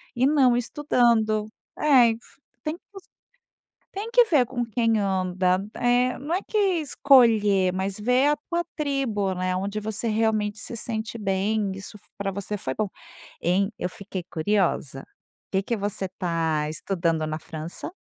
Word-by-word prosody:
e 250 - +2
não 270 -4 +4
estudando. 230 -5 +2 0.3
É, 260 -6 +6
e - - -1
f 225 - -10 0.4
tem 305 +1 -2
que - - -43
esc 390 - -12 0.8
tem 415 +4 -5
que 485 0 +6
ver 295 - +3
com 245 -1 -2
quem 225 0 +1
anda 185 -1 +1
eh, 245 +1 +2
não 295 +5 -4
é 370 - +1
que 430 - -3 0.2
escolher, 220 -10 +4
mas 190 +2 -3
ver 250 +5 +3
a 295 - +3
tua 345 0 0
tribo, 260 - -1
né. 185 0 -1
Onde 200 +3 -2
você 220 +2 -4
realmente 215 -1 +1
se - - -7
sente 225 0 -4
bem. 200 +1 0
Isso 195 +2 -9
f - - -26
pra 200 -1 -2
você 200 +2 -4
foi 130 -9 -4
bom. 210 +7 -2 0.5
Hein, 195 +4 +1
eu 180 - -2
fiquei 190 -1 -7
curiosa: 165 -6 0 0.5
que 190 - +2
que 230 +3 -2
você 200 -1 -3
está 165 -4 -1
estudando 165 -1 -1
na 155 0 -3
França? 160 - -7
210 Hz, 165 wpm, -25 LUFS, 190-245 Hz, 0.8 s, É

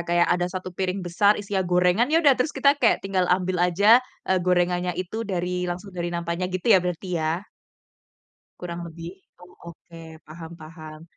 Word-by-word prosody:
kayak 175 0 +3
ada 175 0 0
satu 185 0 -6
piring 185 +1 -2
besar 180 +4 +3
isinya 200 -1 -3
gorengan, 180 +5 +2
ya 310 - +2
udah 285 - +7
terus 295 +4 -1
kita 280 +1 +4
kayak 235 - +2
tinggal 190 -2 0
ambil 180 0 0
aja, 200 +7 +5 0.2
eee, 190 -1 +1
gorengannya 180 0 0
itu 185 +3 -5
dari 180 -1 -2
langsung 180 +3 -6
dari 175 -1 -4
nampannya 170 +1 -3
gitu 185 +2 -5
ya - - +7
berarti 180 +1 -4
ya? 160 +5 -2 1.2
Kurang 175 -1 -6
lebih. 165 0 -9 0.3
Oh 180 0 -16 0.2
oke, 170 +1 -17 0.3
paham 160 +2 -10
paham. 155 0 -11
180 Hz, 170 wpm, -24 LUFS, 175-190 Hz, 1.2 s, udah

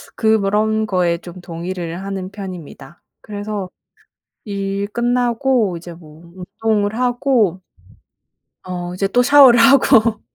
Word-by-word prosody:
그 220 -1 +2
그런 215 +2 0
거에 180 -4 0
좀 175 +1 -12
동의를 175 0 -6
하는 190 -2 -5
편입니다. 175 -7 -10 0.2
그래서 205 -1 -5 0.8
일 200 -1 -3
끝나고 240 -2 0
이제 175 +1 -10
뭐 165 +1 -16
운동을 205 +3 -2
하고 245 -7 +1 1.0
어 180 -1 -6
이제 195 +2 -1
또 245 +5 +2
샤워를 265 -3 +7
하고 230 -5 +4
200 Hz, 225 characters per minute, -18 LUFS, 180-225 Hz, 1.0 s, 샤워를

